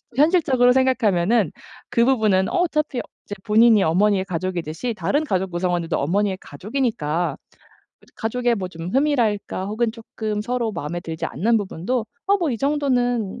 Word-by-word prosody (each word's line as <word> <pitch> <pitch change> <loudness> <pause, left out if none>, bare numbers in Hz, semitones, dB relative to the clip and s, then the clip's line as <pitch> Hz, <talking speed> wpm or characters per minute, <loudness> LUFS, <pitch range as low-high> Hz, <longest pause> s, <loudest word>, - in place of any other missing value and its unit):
현실적으로 275 -5 +4
생각하면은 225 - +2 0.4
그 235 - +3
부분은 215 -7 +3
어 365 - 0
어차피 305 -6 -1 0.2
이제 205 - -6
본인이 220 -1 +5
어머니의 190 +4 +2
가족이듯이 180 +3 -3
다른 290 +7 0
가족 190 -9 -1
구성원들도 175 -1 -1
어머니의 190 +6 0
가족이니까 175 - -2 0.8
가족의 240 +1 0
뭐 190 -4 -4
좀 165 -1 -7
흠이랄까 240 -9 +1
혹은 220 +2 -1
쪼끔 220 -2 -5
서로 240 -1 -2
마음에 170 0 -4
들지 160 -2 -5
않는 225 - +1
부분도 210 +4 -2 0.2
'어 400 +1 +4
뭐 335 -5 0
이 240 - -1
정도는 245 -7 0
215 Hz, 365 characters per minute, -22 LUFS, 185-250 Hz, 0.8 s, 본인이